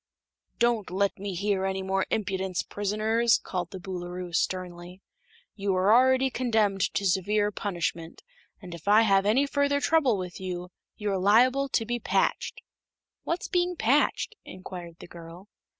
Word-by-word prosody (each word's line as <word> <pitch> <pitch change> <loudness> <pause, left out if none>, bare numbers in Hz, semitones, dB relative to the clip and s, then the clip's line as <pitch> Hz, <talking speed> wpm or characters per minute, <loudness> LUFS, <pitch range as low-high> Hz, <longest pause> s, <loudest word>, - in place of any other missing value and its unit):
"Don't 235 -3 +1
let 195 +2 0
me 200 -1 -4
hear 200 +1 0
any 190 0 -2
more 190 0 -1
impudence, 190 -3 -2
prisoners!" 215 +3 +1
called 180 -2 -4
the 190 - -8
Boolooroo, 180 -1 -6
sternly. 180 +1 -3 0.5
"You 200 -2 -1
are 190 +3 +4
already 260 +2 +4
condemned 220 -6 +1
to 200 - 0
severe 205 +3 +1
punishment, 170 -5 -4 0.4
and 180 -4 -10
if 170 +2 -11
I 210 +2 +6
have 195 -2 +3
any 255 +7 +3
further 285 0 +1
trouble 285 -7 +2
with 180 -2 -6
you, 180 -1 -5 0.3
you 210 -1 -2
are 190 - 0
liable 250 +8 +4
to 225 - 0
be 240 +1 -2
patched." - - -1 0.6
"What's 340 +2 -2
being 355 -1 0
patched?" 285 - +1
inquired 180 -2 -9
the - - -12
girl. 170 +3 -12
200 Hz, 150 wpm, -27 LUFS, 185-230 Hz, 0.6 s, I